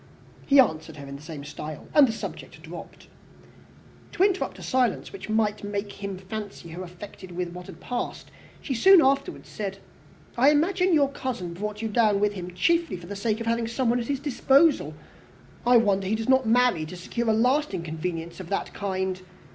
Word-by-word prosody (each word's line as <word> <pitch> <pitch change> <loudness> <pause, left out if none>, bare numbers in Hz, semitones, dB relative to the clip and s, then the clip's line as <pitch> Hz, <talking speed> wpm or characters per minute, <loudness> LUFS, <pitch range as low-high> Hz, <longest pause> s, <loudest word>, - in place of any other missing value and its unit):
He 280 0 +6
answered 160 - +2
her 140 - -8
in 140 0 -8
the 140 - -10
same 150 -2 -8
style, 150 +1 -8
and 290 -3 +7
the - - -1
subject 220 - -7
dropped. - - -10 1.1
To 360 - +2
interrupt 390 -1 +1
a - - -10
silence 255 - 0
which 395 - -8
might 215 -1 +1
make 205 0 -3
him 200 -1 -6
fancy 195 -2 -7
her 170 +3 -7
affected 185 +1 -10
with 175 0 -3
what 180 0 -9
had - - -11
passed, 245 -1 -5 0.3
she 275 - -2
soon 380 +10 +7
afterwards 275 +7 0
said, 195 -2 -5 0.6
"I 260 +4 +5
imagine 360 +5 +2
your 285 -4 +4
cousin 240 -11 -4
brought 210 +4 -5
you - - 0
down 215 -2 +3
with 205 0 +2
him 180 -2 -7
chiefly 335 - +2
for 175 - -11
the 200 +3 -6
sake 215 +2 -1
of - - -3
having 230 0 0
somebody 240 0 +1
at 230 - -6
his 280 -2 -1
disposal. 285 +2 +3 0.7
I 245 0 +7
wonder 200 -4 +2
he 215 - +1
does 225 0 -4
not 260 -2 +4
marry, 240 -7 +3
to 180 - -8
secure 230 +6 -3
a - - +4
lasting 245 - +1
convenience 165 +1 -5
of 180 -2 -8
that 200 - -2
kind. 190 -2 -2
215 Hz, 195 wpm, -26 LUFS, 180-260 Hz, 1.1 s, and